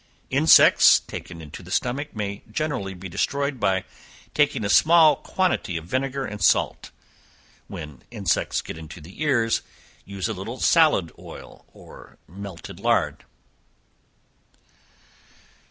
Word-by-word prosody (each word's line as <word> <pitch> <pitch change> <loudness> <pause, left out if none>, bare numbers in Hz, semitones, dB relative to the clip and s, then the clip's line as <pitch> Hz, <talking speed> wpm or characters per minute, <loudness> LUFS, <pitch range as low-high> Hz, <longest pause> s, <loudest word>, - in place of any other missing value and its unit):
Insects - - +6
taken 85 -2 -9
into 75 - -10
the - - -14
stomach, 135 +3 -2
may 100 -1 -4
generally 110 -9 -3
be 95 +2 -8
destroyed 140 - -2
by 95 -3 +1 0.5
taking 145 -7 +1
a - - 0
small 160 +4 +6
quantity 180 - -1
of 80 - -7
vinegar 135 +5 -2
and 105 -1 -7
salt. - - +1 0.8
When 75 -4 -9
insects 100 -7 -1
get - - -8
into 80 +1 -10
the 85 - -13
ears, 120 -7 +1 0.4
use 100 0 -4
a 110 - -3
little 110 +6 -7
salad 155 - +3
oil, - - -12
or - - -15
melted 95 0 -10
lard. - - 0
105 Hz, 120 wpm, -23 LUFS, 90-140 Hz, 0.8 s, Insects